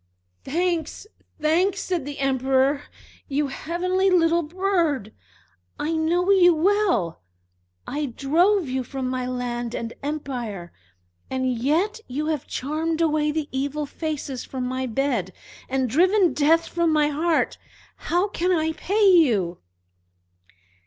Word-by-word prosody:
"Thanks! 340 Hz, +4 st, -1 dB, 0.3 s
thanks!" 350 Hz, +6 st, +2 dB
said 355 Hz, -8 st, -2 dB
the 285 Hz, 0 st, -6 dB
Emperor. 270 Hz, +1 st, +1 dB, 0.5 s
"You 285 Hz, 0 st, -1 dB
heavenly 365 Hz, +6 st, 0 dB
little 340 Hz, -2 st, +3 dB
bird! 335 Hz, -, -1 dB, 0.6 s
I 310 Hz, -, -2 dB
know 340 Hz, +4 st, +1 dB
you 355 Hz, -3 st, +6 dB
well. 360 Hz, -, +1 dB, 0.6 s
I 295 Hz, +2 st, -2 dB
drove 330 Hz, -, +2 dB
you 260 Hz, 0 st, -2 dB
from 260 Hz, +1 st, -4 dB
my 255 Hz, 0 st, -2 dB
land 245 Hz, -1 st, -3 dB
and 230 Hz, 0 st, -4 dB
empire, 245 Hz, -, -5 dB, 0.6 s
and 260 Hz, -1 st, 0 dB
yet 330 Hz, -, 0 dB
you 290 Hz, +5 st, -3 dB
have 310 Hz, -3 st, -2 dB
charmed 315 Hz, +4 st, -2 dB
away 305 Hz, -2 st, +2 dB
the 305 Hz, -1 st, -2 dB
evil 285 Hz, +3 st, -2 dB
faces 290 Hz, -4 st, -4 dB
from 255 Hz, -2 st, -5 dB
my 260 Hz, +1 st, -2 dB
bed, 230 Hz, -7 st, -1 dB, 0.4 s
and 265 Hz, 0 st, 0 dB
driven 365 Hz, -, +3 dB
Death 325 Hz, +3 st, +3 dB
from 340 Hz, -1 st, +1 dB
my 300 Hz, -1 st, +3 dB
heart! 320 Hz, +3 st, 0 dB, 0.4 s
How 355 Hz, +4 st, 0 dB
can 365 Hz, -2 st, -1 dB
I 320 Hz, -2 st, +1 dB
pay 405 Hz, +6 st, +1 dB
you?" 230 Hz, -, +4 dB
300 Hz, 125 wpm, -24 LUFS, 260-345 Hz, 0.6 s, you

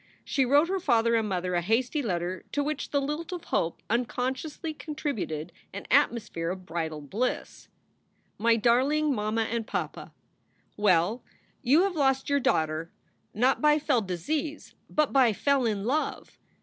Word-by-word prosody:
She 270 Hz, -3 st, +1 dB
wrote 285 Hz, +5 st, +4 dB
her 385 Hz, +1 st, -1 dB
father 230 Hz, -8 st, +2 dB
and 225 Hz, -2 st, +1 dB
mother 180 Hz, -1 st, -1 dB
a 175 Hz, -, +2 dB
hasty 245 Hz, -, +1 dB
letter 180 Hz, -5 st, -2 dB
to 290 Hz, -, +1 dB
which 300 Hz, 0 st, -3 dB
the 285 Hz, -, +1 dB
lilt 300 Hz, +5 st, -3 dB
of 355 Hz, -2 st, -5 dB
hope 165 Hz, -, -1 dB
unconsciously 255 Hz, +7 st, -2 dB
contributed 275 Hz, -, -4 dB, 0.2 s
an 200 Hz, -, -7 dB
atmosphere 210 Hz, -8 st, +2 dB
of 185 Hz, 0 st, -5 dB
bridal 160 Hz, -2 st, -3 dB
bliss. 215 Hz, -, -3 dB, 0.7 s
MY 230 Hz, +2 st, +4 dB
DARLING 270 Hz, +7 st, +3 dB
MAMMA 215 Hz, 0 st, 0 dB
AND 225 Hz, 0 st, -3 dB
PAPA, -, -, -4 dB, 0.6 s
Well, 205 Hz, +3 st, +2 dB, 0.4 s
you 295 Hz, +9 st, +4 dB
have 390 Hz, -2 st, 0 dB
lost 270 Hz, -2 st, +1 dB
your 285 Hz, -, +4 dB
daughter 160 Hz, -, 0 dB, 0.4 s
not 250 Hz, +5 st, +2 dB
by 300 Hz, 0 st, +5 dB
fell 285 Hz, -5 st, +1 dB
disease, 285 Hz, -, -3 dB, 0.2 s
but 305 Hz, -1 st, +1 dB
by 255 Hz, -5 st, +5 dB
fell 275 Hz, +2 st, +2 dB
in 205 Hz, -3 st, -1 dB
love. 285 Hz, +8 st, -2 dB
240 Hz, 150 wpm, -28 LUFS, 195-290 Hz, 0.7 s, by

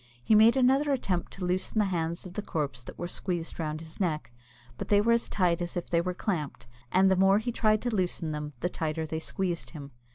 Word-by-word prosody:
He 220 Hz, -, +3 dB
made 220 Hz, +4 st, +6 dB
another 270 Hz, +3 st, +3 dB
attempt 190 Hz, -10 st, -1 dB
to 190 Hz, -, -5 dB
loosen 185 Hz, +4 st, -1 dB
the 210 Hz, -, +4 dB
hands 170 Hz, -2 st, -2 dB
of 180 Hz, -, -9 dB
the 210 Hz, -, -3 dB
corpse 140 Hz, -10 st, -3 dB
that -, -, -10 dB
were 175 Hz, -, -4 dB
squeezed 175 Hz, -2 st, -4 dB
round 155 Hz, -1 st, -3 dB
his 160 Hz, -1 st, -10 dB
neck, 155 Hz, -, -1 dB, 0.5 s
but -, -, -4 dB
they 205 Hz, -, +4 dB
were 225 Hz, +3 st, +3 dB
as 235 Hz, 0 st, +2 dB
tight 175 Hz, -3 st, +1 dB
as 175 Hz, 0 st, -3 dB
if 175 Hz, -, -5 dB
they 170 Hz, -1 st, +3 dB
were 180 Hz, +1 st, -3 dB
clamped; 170 Hz, -8 st, -3 dB, 0.3 s
and 190 Hz, +1 st, +5 dB
the -, -, +4 dB
more 195 Hz, +1 st, +5 dB
he 230 Hz, +3 st, -1 dB
tried 215 Hz, -2 st, +2 dB
to 240 Hz, -3 st, -1 dB
loosen 175 Hz, -4 st, -1 dB
them, 150 Hz, 0 st, -5 dB
the 175 Hz, -, +1 dB
tighter 160 Hz, -2 st, -2 dB
they 160 Hz, 0 st, -3 dB
squeezed 175 Hz, +1 st, -2 dB
him. 140 Hz, -1 st, -9 dB
180 Hz, 235 wpm, -28 LUFS, 160-205 Hz, 0.5 s, made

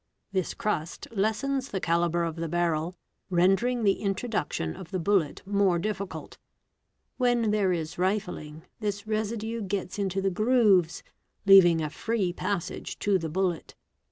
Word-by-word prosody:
This 190 Hz, -3 st, -1 dB
crust 165 Hz, -6 st, -3 dB
lessens 230 Hz, +6 st, -1 dB
the 190 Hz, -, -2 dB
calibre 170 Hz, 0 st, +1 dB
of 165 Hz, -, -5 dB
the 165 Hz, 0 st, -3 dB
barrel, 170 Hz, 0 st, 0 dB, 0.3 s
rendering 195 Hz, +7 st, +2 dB
the 195 Hz, -2 st, +2 dB
introduction 195 Hz, -, -2 dB
of 170 Hz, -, -10 dB
the 190 Hz, -, -2 dB
bullet 185 Hz, -4 st, +1 dB
more 200 Hz, -3 st, +2 dB
difficult. 200 Hz, +1 st, -5 dB, 0.8 s
When 245 Hz, -4 st, +2 dB
there 205 Hz, -3 st, +2 dB
is 165 Hz, -3 st, -2 dB
| -, -, -23 dB
"vifling, 180 Hz, -5 st, -2 dB, 0.2 s
this 205 Hz, -1 st, -3 dB
residue 220 Hz, +1 st, -2 dB
gets 195 Hz, -1 st, -3 dB
into 195 Hz, -1 st, -1 dB
the 195 Hz, 0 st, 0 dB
grooves, 205 Hz, -5 st, +3 dB, 0.4 s
leaving 180 Hz, -4 st, +7 dB
a 155 Hz, -1 st, -3 dB
free 210 Hz, -6 st, -1 dB
passage 185 Hz, -1 st, -3 dB
to 200 Hz, -2 st, +2 dB
the 160 Hz, -1 st, -4 dB
bullet. 180 Hz, 0 st, -2 dB
195 Hz, 145 wpm, -27 LUFS, 175-215 Hz, 0.8 s, leaving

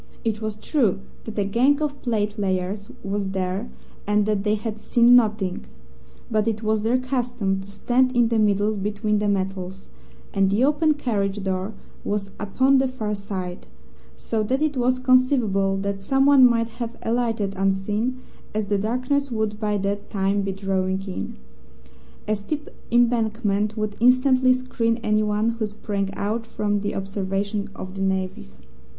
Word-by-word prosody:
It 220 Hz, -1 st, -1 dB
was 215 Hz, -1 st, -3 dB
true 215 Hz, -, +1 dB, 0.2 s
that 220 Hz, -, -7 dB
a 205 Hz, -, +2 dB
gang 250 Hz, +9 st, +3 dB
of 290 Hz, -2 st, -2 dB
platelayers 205 Hz, -3 st, -1 dB
was 195 Hz, 0 st, -2 dB
there, 190 Hz, +3 st, -2 dB, 0.4 s
and 210 Hz, 0 st, +3 dB
that 210 Hz, -2 st, 0 dB
they 210 Hz, 0 st, +2 dB
had 215 Hz, 0 st, -5 dB
seen 240 Hz, +2 st, +5 dB
nothing, 210 Hz, -, +2 dB, 0.7 s
but 215 Hz, 0 st, +1 dB
it 220 Hz, 0 st, -1 dB
was 215 Hz, 0 st, +1 dB
their 230 Hz, +4 st, +2 dB
custom 245 Hz, -6 st, -1 dB
to 190 Hz, -, -11 dB
stand 250 Hz, +5 st, +1 dB
in 240 Hz, -1 st, +4 dB
the 230 Hz, -1 st, +2 dB
middle 210 Hz, 0 st, +2 dB
between 210 Hz, +1 st, -1 dB
the 210 Hz, -, 0 dB
metals, 190 Hz, -1 st, -2 dB, 0.4 s
and 195 Hz, -1 st, +3 dB
the 205 Hz, +5 st, +2 dB
open 300 Hz, +2 st, +3 dB
carriage 205 Hz, -7 st, -1 dB
door 190 Hz, +2 st, -2 dB, 0.3 s
was 200 Hz, -1 st, -2 dB
upon 260 Hz, +7 st, +3 dB
the 265 Hz, -, +2 dB
far 220 Hz, -5 st, -3 dB
side, 190 Hz, -3 st, -5 dB, 0.5 s
so 225 Hz, -1 st, -2 dB
that 255 Hz, +6 st, 0 dB
it 305 Hz, -2 st, 0 dB
was 255 Hz, 0 st, +2 dB
conceivable 255 Hz, -7 st, +3 dB
that 200 Hz, 0 st, -2 dB
someone 270 Hz, +4 st, +5 dB
might 230 Hz, -1 st, +1 dB
have 235 Hz, 0 st, -4 dB
alighted 225 Hz, -4 st, 0 dB
unseen, 205 Hz, +6 st, 0 dB, 0.3 s
as 215 Hz, -1 st, 0 dB
the 200 Hz, 0 st, 0 dB
darkness 255 Hz, +6 st, 0 dB
would 220 Hz, -3 st, -2 dB
by 210 Hz, -1 st, 0 dB
that 200 Hz, +1 st, -2 dB
time 195 Hz, 0 st, +1 dB
be 195 Hz, 0 st, -2 dB
drawing 190 Hz, -1 st, -1 dB
in. 180 Hz, -, -5 dB, 0.9 s
A 215 Hz, -, +2 dB
steep 295 Hz, +9 st, -5 dB, 0.2 s
embankment 220 Hz, -3 st, +1 dB
would 215 Hz, -1 st, -2 dB
instantly 255 Hz, +1 st, +5 dB
screen 235 Hz, -3 st, -1 dB
anyone 215 Hz, +1 st, +2 dB
who 230 Hz, -2 st, -2 dB
sprang 205 Hz, -2 st, -3 dB
out 225 Hz, +3 st, -2 dB
from 205 Hz, -2 st, -1 dB
the 205 Hz, +1 st, -3 dB
observation 195 Hz, +1 st, -2 dB
of 185 Hz, 0 st, -7 dB
the 195 Hz, -, -5 dB
navvies. 185 Hz, -, -3 dB
210 Hz, 155 wpm, -23 LUFS, 195-240 Hz, 0.9 s, seen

